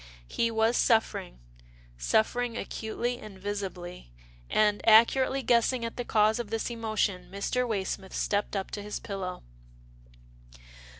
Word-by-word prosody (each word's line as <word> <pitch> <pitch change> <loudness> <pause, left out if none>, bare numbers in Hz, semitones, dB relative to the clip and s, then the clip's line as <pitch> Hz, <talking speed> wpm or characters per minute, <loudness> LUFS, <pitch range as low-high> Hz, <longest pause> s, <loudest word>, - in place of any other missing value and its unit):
He 230 - 0
was 225 +1 +2
suffering 225 - +1 0.3
— - - -26
suffering 230 - +1
acutely 240 +3 -3
and 210 -3 -10
visibly, 185 - -6 0.4
and, 210 -1 +3
accurately 260 +4 +5
guessing 235 +1 +2
at 230 - -5
the 245 - -3
cause 215 -1 +3
of 235 -3 -4
this 225 +2 -2
emotion, 215 -5 -1
Mr. 245 +6 -1
Way 205 -4 -1
smith 190 0 -5
stepped 205 0 -1
up 195 -1 -3
to 205 - -4
his 210 +1 -5
pillow. 190 -3 -5
215 Hz, 135 wpm, -28 LUFS, 195-230 Hz, 0.4 s, accurately